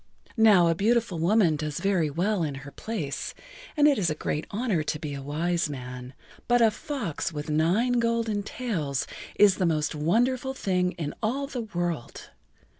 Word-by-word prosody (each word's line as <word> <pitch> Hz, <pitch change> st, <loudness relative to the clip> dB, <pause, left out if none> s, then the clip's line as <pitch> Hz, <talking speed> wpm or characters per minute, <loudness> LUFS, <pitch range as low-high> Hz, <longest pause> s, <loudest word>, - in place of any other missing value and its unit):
Now 210 Hz, -6 st, +6 dB
a 165 Hz, -, +3 dB
beautiful 215 Hz, 0 st, +1 dB
woman 175 Hz, -2 st, +3 dB
does 150 Hz, -1 st, -3 dB
very 185 Hz, -6 st, +1 dB
well 180 Hz, +6 st, 0 dB
in 150 Hz, -4 st, -2 dB
her 140 Hz, -, -9 dB
place 150 Hz, -11 st, -4 dB, 0.4 s
and 295 Hz, 0 st, +6 dB
it 285 Hz, -5 st, +3 dB
is 175 Hz, -4 st, +1 dB
a 155 Hz, -, -1 dB
great 150 Hz, 0 st, -3 dB
honor 210 Hz, -6 st, 0 dB
to 150 Hz, -, -2 dB
be 150 Hz, -1 st, -5 dB
a 140 Hz, -, -5 dB
wise 165 Hz, +4 st, -1 dB
man, 125 Hz, -1 st, -7 dB, 0.3 s
but 245 Hz, 0 st, +4 dB
a 225 Hz, -2 st, +5 dB
fox 210 Hz, -, -4 dB
with 150 Hz, 0 st, -5 dB
nine 200 Hz, +11 st, +2 dB
golden 230 Hz, -3 st, 0 dB
tails 180 Hz, -, -2 dB, 0.3 s
is 205 Hz, -2 st, +5 dB
the 185 Hz, -, +2 dB
most 155 Hz, -1 st, 0 dB
wonderful 245 Hz, -, +1 dB
thing 180 Hz, -5 st, 0 dB
in 155 Hz, -4 st, -4 dB
all 255 Hz, +6 st, 0 dB
the 265 Hz, -3 st, -4 dB
world. 175 Hz, -, -4 dB
180 Hz, 175 wpm, -27 LUFS, 155-225 Hz, 0.4 s, Now